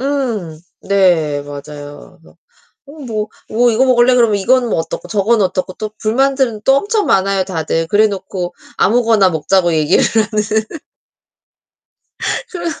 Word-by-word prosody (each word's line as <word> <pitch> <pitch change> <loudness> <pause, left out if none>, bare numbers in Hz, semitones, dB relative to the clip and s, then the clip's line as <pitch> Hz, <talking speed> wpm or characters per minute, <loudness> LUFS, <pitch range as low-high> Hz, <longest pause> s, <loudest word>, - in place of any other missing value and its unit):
음 240 - -3 0.3
네 170 -7 +2
맞아요. 145 0 -10
그래서 - - -21 0.5
"어 280 - -13
뭐 215 -2 -3 0.2
뭐 240 +2 +3
이거 230 +3 +2
먹을래?" 250 -1 +4
그러면 230 -4 +3
이건 245 +4 +2
뭐 - - 0
어떻고 165 +2 -5
저거는 210 +1 +2
어떻고 185 0 -3
또 215 -1 -5
불만들은 255 -1 0
또 270 - +5
엄청 415 +6 0
많아요, 195 0 +1
다들. 165 -2 -2
그래 210 +4 +4
놓고 190 -3 -5 0.2
아무거나 225 -3 +3
먹자고 175 +2 +1
얘기를 155 +2 +2
하는. 220 -1 +2 2.3
그래서 345 -4 -5
210 Hz, 295 characters per minute, -16 LUFS, 175-240 Hz, 2.3 s, 또